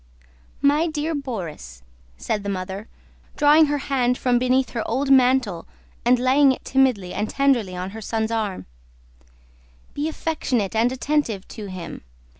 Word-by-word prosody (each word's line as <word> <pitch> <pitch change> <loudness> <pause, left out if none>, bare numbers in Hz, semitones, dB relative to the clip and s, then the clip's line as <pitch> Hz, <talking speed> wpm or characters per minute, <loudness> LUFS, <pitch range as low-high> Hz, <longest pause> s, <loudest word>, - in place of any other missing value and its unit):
"My 295 +4 +3
dear 310 0 -2
Borís," 175 - -6 0.3
said 210 - -2
the 200 - -4
mother, 190 +2 -5 0.5
drawing 300 +1 +6
her 290 0 0
hand 255 -3 0
from 245 -1 +2
beneath 255 +1 +1
her 230 - -2
old 270 +4 0
mantle 250 -9 +3 0.4
and 245 +1 +4
laying 265 +3 +4
it 260 - -5
timidly 255 -9 +1
and 210 - -2
tenderly 255 -9 +1
on 180 +1 -5
her 220 +2 -8
son's 220 +1 -2
arm, 215 -4 -2 1.3
"be 295 +2 -2
affectionate 260 - -2
and 230 +3 +3
attentive 260 -7 -1
to 215 -3 -8
him. 185 -3 -7
245 Hz, 145 wpm, -23 LUFS, 205-275 Hz, 1.3 s, drawing